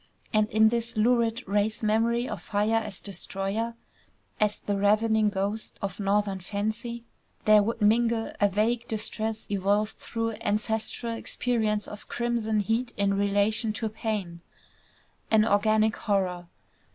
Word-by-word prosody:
And 215 0 +3
in 220 +1 +5
this 235 0 -2
lurid 235 +1 +2
race 210 +3 0
memory 230 +3 +2
of - - -5
fire 210 +2 +1
as 215 -4 -3
destroyer, 200 +4 -3 0.6
as 210 -1 +2
the 205 - -2
"ravening 215 +2 +3
ghost" 200 +2 -3
of 195 -1 -4
Northern 200 -1 +1
fancy, 220 +5 -3 0.4
there 215 -1 +7
would 225 +1 -2
mingle 225 +1 +2
a 205 - +6
vague 230 +4 0
distress 220 0 -3
evolved 205 +2 +1
through 225 -1 -3
ancestral 220 +2 -1
experience 220 -2 -1
of 210 - -10
crimson 230 -3 0
heat 230 +4 -1
in 200 0 +2
relation 205 +2 +1
to 220 +1 -2
pain, 205 -6 -4 0.9
an 220 -1 +5
organic 215 +1 +3
horror. 185 -4 -1
215 Hz, 130 wpm, -27 LUFS, 205-225 Hz, 0.9 s, there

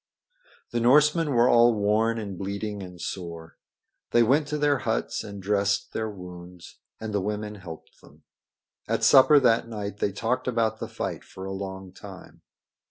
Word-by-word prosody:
The 120 - -1
Norsemen 150 +6 +4
were 120 -3 +4
all 120 -1 +5
worn 110 +2 +1
and 100 -4 -5
bleeding 100 +2 -4
and 90 -2 -10
sore. 85 -1 -7 0.5
They 120 - +4
went 140 +6 +2
to 150 - -2
their 145 -2 +2
huts 110 -2 -2
and 100 -2 -9
dressed 100 0 0
their 110 0 -2
wounds, 90 -2 -11 0.2
and 110 -1 -5
the 100 - +1
women 105 +1 -3
helped 90 -6 -11
them. - - -20 0.6
At - - -1
supper 145 +2 +7
that 115 -2 +3
night 105 -3 -5
they 100 - 0
talked 125 +6 -2
about 115 -3 0
the - - -4
fight - - -5
for 95 - -10
a 95 - -5
long 95 -1 -6
time. 95 -1 -12
105 Hz, 165 wpm, -26 LUFS, 95-120 Hz, 0.6 s, supper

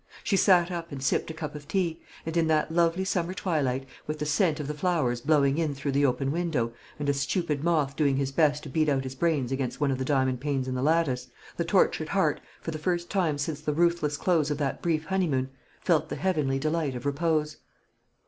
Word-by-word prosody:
She 200 - +1
sat 185 -2 +4
up 170 -1 -5
and 135 -2 -6
sipped 135 - +1
a - - -4
cup 155 -3 -5
of 145 -1 -9
tea; 170 -1 -1 0.2
and 160 0 -4
in 165 -1 +3
that 155 0 +2
lovely 170 +2 +2
summer 180 -1 -1
twilight, 135 -8 -1 0.2
with 155 +1 -3
the 150 - -3
scent 155 +1 +2
of 145 - -4
the 150 - -2
flowers 150 -7 0
blowing 140 0 +3
in 155 -4 0
through 140 +1 -2
the 140 +1 +3
open 135 +2 0
window, 150 -9 -1 0.2
and 145 -1 -3
a 140 - +3
stupid 145 +1 -1
moth 155 -5 +1
doing 140 -3 +2
his 135 -1 -1
best 150 0 +2
to 150 - -7
beat 155 +3 +1
out 135 -2 +1
his 130 0 -5
brains 140 -3 0
against 135 -2 -2
one 145 -2 +2
of 130 - -2
the - - 0
diamond 130 -2 +1
panes 135 -2 -1
in 130 - -2
the 125 - -2
lattice, 140 -4 +1 0.3
the - - -1
tortured - - +2
heart, - - +1 0.2
for - - -4
the 155 - -5
first 175 +1 -1
time 175 -7 +1
since 145 +1 -3
the 150 -1 -1
ruthless 170 -2 +1
close 160 -4 +2
of 150 - -1
that 140 -2 -2
brief 160 -2 0
honeymoon, 150 -9 0 0.3
felt 160 -3 +2
the - - -3
heavenly 150 -8 0
delight 155 -1 -1
of 125 - -6
repose. 150 +1 0
150 Hz, 225 wpm, -27 LUFS, 135-165 Hz, 0.3 s, sat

